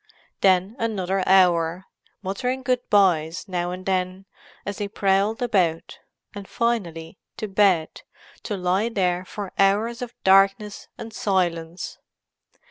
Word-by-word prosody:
Then 190 +2 +3
another 195 -4 -1
hour—muttering 190 +7 0
good 250 0 +1
byes 175 -4 +2
now 175 -2 -2
and 185 +1 -7
then, 185 0 -1 0.4
as 205 0 -5
they 205 - -2
prowled 200 +3 +1
about; 180 -7 0 0.3
and 200 -1 -8
finally, 185 -9 -2 0.2
to 215 - -4
bed, 190 -5 +2 0.4
to 205 - -4
lie 185 +5 0
there 180 -5 0
for 200 0 -7
hours 215 +5 +2
of 245 -1 -6
darkness 195 +2 +3
and 225 -1 -8
silence. 175 -3 -2
195 Hz, 120 wpm, -23 LUFS, 180-210 Hz, 0.4 s, Then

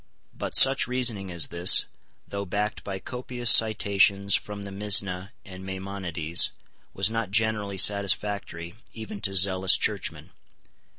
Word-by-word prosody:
But - - -1
such 135 +1 +5
reasoning 120 -6 0
as 85 -3 -1
this, 85 +1 +3 0.4
though 100 0 -5
backed 105 +2 -4
by 95 -1 -6
copious 125 +2 0
citations 100 -2 +2
from 105 -1 -3
the 100 - -9
Misna 100 -2 0 0.2
and 95 -1 -11
Maimonides, 95 -4 -1 0.4
was 95 +2 0
not 115 -3 -3
generally 105 -1 -1
satisfactory 100 -3 -1 0.2
even 110 -2 -9
to 95 -2 -2
zealous 95 0 +4
churchmen. - - -4
100 Hz, 125 wpm, -25 LUFS, 95-105 Hz, 0.4 s, such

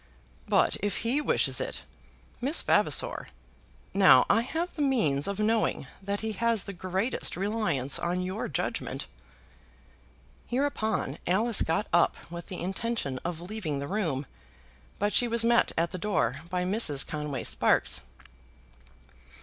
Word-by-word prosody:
"But - - +3
if 205 +1 -2
he 260 +6 +2
wishes - - +2
it, - - -4 0.6
Miss 280 +6 +1
Vavasor! - - +1 0.7
Now - - +7
I 225 - +4
have 325 +8 -3
the 300 - -4
means 160 - +2
of 200 -1 -3
knowing 215 -6 +1 0.2
that 200 +1 -3
he 220 0 -2
has 230 0 +1
the 200 - -7
greatest 190 +6 -2
reliance 195 - 0
on 180 +1 -1
your 185 +4 -3
judgement." 140 - -3 1.4
Hereupon 240 - -1
Alice 215 +5 +3
got 165 +6 0
up 175 -1 +3
with 170 -1 -7
the 185 - -6
intention 190 - -2
of 170 -1 -4
leaving 180 -6 -4
the 140 +1 -4
room, 160 -9 -1 0.7
but 205 +1 0
she 245 - +4
was 230 0 0
met 235 0 +4
at 170 +1 +1
the 185 - -5
door 210 +3 0
by 180 0 -1
Mrs. 180 -8 +4
Conway 150 -4 -4
Sparkes. - - +2
200 Hz, 140 wpm, -28 LUFS, 170-230 Hz, 1.4 s, Now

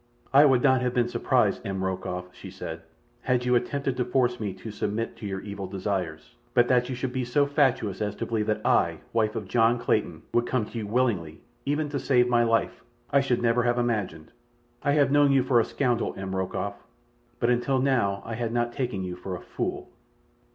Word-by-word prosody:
"I 140 +2 +8
would 130 -3 +4
not 130 -2 +4
have 125 0 -1
been 120 -1 +2
surprised, - - +1
M. 95 -1 -3
Rokoff," 90 -1 -4
she - - -10
said, 80 0 -7 0.4
"had 125 -1 0
you 125 - +2
attempted 135 +2 0
to 125 - +1
force 125 0 +1
me 105 -3 -2
to 110 +4 -8
submit 105 +2 -3
to 105 - -6
your 95 -1 -4
evil 100 -2 -6
desires, 95 -1 -4 0.2
but 120 -1 +5
that 125 0 +3
you 130 - -2
should 125 0 -3
be 130 -1 -1
so 130 +4 +2
fatuous 135 -9 +1
as 105 -1 -1
to - - -3
believe 110 -2 -1
that 110 0 -1
I, - - +2
wife 110 -2 +1
of 105 - -4
John 115 +2 +3
Clayton, 105 -8 -1
would 120 0 +2
come 125 -4 0
to 115 - -8
you 105 - -4
willingly, 105 -9 0 0.3
even 150 +2 0
to 140 -1 -2
save 125 -3 +3
my 120 -1 +3
life, 115 -1 0 0.3
I 140 - +5
should 125 -3 0
never 115 +1 +3
have 120 0 +1
imagined. 105 -10 -2 0.5
I 145 -1 +1
have 145 -2 +3
known 145 -1 +5
you 135 -2 +4
for 125 -2 +3
a - - +4
scoundrel, 120 0 -1
M. 95 0 -4
Rokoff; 95 -1 -3 0.6
but 120 - +2
until 125 +2 +1
now 120 -8 +1
I 115 - -5
had 115 0 -2
not 120 0 0
taken 120 -8 -2
you 90 -1 -4
for 90 +1 -6
a - - -7
fool." - - -4
120 Hz, 215 wpm, -26 LUFS, 100-125 Hz, 0.6 s, I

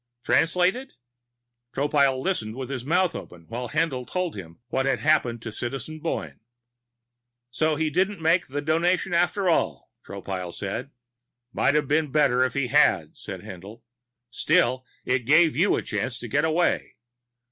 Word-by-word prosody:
"Translated?" 180 +10 +2 0.8
Tropile 140 -1 +2
listened 110 - -2
with 130 0 -6
his 130 -3 -4
mouth 175 +5 +2
open 85 -2 -9
while 120 +1 -4
Haendl 155 -6 -1
told 180 -2 -2
him 85 -5 -8
about - - -27
what 135 0 0
had 135 - +1
happened 125 -7 +2
to 110 - -5
Citizen 135 +7 -5
Boyne. 165 - -4 1.1
"So 155 +5 +1
he 155 0 -1
didn't 190 +4 0
make 165 +2 +2
the 145 +2 -3
Donation 175 +4 +1
after 180 +3 +1
all," 170 - 0
Tropile 95 -3 -6
said. 100 +7 -4 0.6
"Might 140 - +2
have 150 -2 +2
been 150 0 +1
better 135 -4 +3
if 130 0 -1
he 140 -3 0
had," - - +3
said - - -8
Haendl. 100 +5 -10 0.5
"Still, 130 +1 +1 0.2
it 125 +1 +2
gave 155 +2 +5
you - - +3
a - - -2
chance - - -3
to - - -7
get 145 +3 +1
away. 165 +2 0
145 Hz, 160 wpm, -25 LUFS, 125-165 Hz, 1.1 s, gave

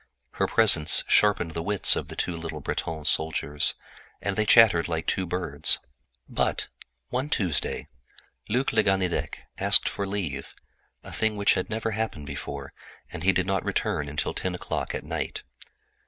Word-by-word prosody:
Her - - -1
presence 95 -9 +4
sharpened 100 -5 +3
the 85 - -4
wits 100 +2 +4
of - - -4
the - - -9
two 90 - -2
little 80 -2 -6
Breton 80 +2 -4
soldiers, 75 -1 +2 0.4
and 100 -1 -2
they 105 +1 0
chattered 105 -9 +6
like 80 -1 -3
two 95 +2 -1
birds. 80 -4 +1 0.5
But, - - -1 0.4
one 130 +4 -2
Tuesday, 90 - 0 0.6
Luc 125 +5 0
le - - +4
Ganidec 95 -3 0 0.2
asked - - +5
for 100 - -3
leave—a 85 -9 -7
thing 110 -1 -1
which 100 0 +4
had 95 - -2
never 110 0 -2
happened 105 -8 -3
before—and 70 -2 -9
he 95 - +4
did 95 -1 0
not 95 -1 -1
return 75 -1 -1
until 75 - -2
ten 95 -1 -3
o'clock - - -4
at - - -5
night. - - -4
90 Hz, 155 wpm, -26 LUFS, 80-105 Hz, 0.6 s, chattered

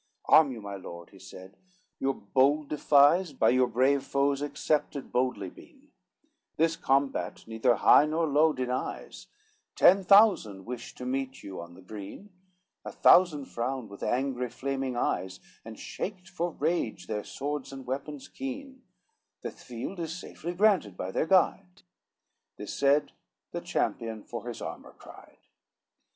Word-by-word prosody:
XX - - +1
"Arm 155 -3 +7
you, 115 -3 -7
my 100 -1 -6
lord," 85 -2 -10
he - - -16
said, 95 +2 -12 0.4
"your 135 0 0
bold 140 +7 +1
defies 150 +3 +4
By - - +3
your 125 0 +3
brave 130 +4 +2
foes 140 0 0
accepted 145 -1 -2
boldly 125 -7 -1
been, 295 -2 -18 0.7
This 165 +1 +2
combat 135 -3 0
neither 115 +2 +1
high 150 - +6
nor 160 +2 0
low 155 +1 +4
denies, 130 -2 -4 0.5
Ten 190 +2 +6
thousand 180 - +4
wish 120 -1 -7
to 125 - -8
meet 130 +1 -3
you 95 -3 -7
on 85 0 -11
the 95 - -15
green; 105 - -9 0.5
A - - -6
thousand 160 -6 +5
frowned 125 -2 -4
with 100 - -11
angry 125 -1 -1
flaming 135 -1 -3
eyes, 95 -5 -2 0.2
And 115 -1 -10
shaked 185 -2 -6
for 175 -1 -2
rage 150 - -2
their 105 +2 -3
swords 145 0 -5
and 135 -1 -9
weapons 140 +2 -5
keen; 270 0 -7 0.6
The - - -5
field 125 +10 -8
is 165 0 -4
safely 175 -1 -7
granted 180 - +2
by 95 - -4
their 155 - -1
guide," 185 0 +1 0.7
This - - -6
said, 140 +1 +2 0.4
the - - -4
champion 110 -2 -2
for 120 0 -7
his 120 - -6
armor - - -8
cried. - - -15
135 Hz, 150 wpm, -28 LUFS, 120-160 Hz, 0.7 s, Arm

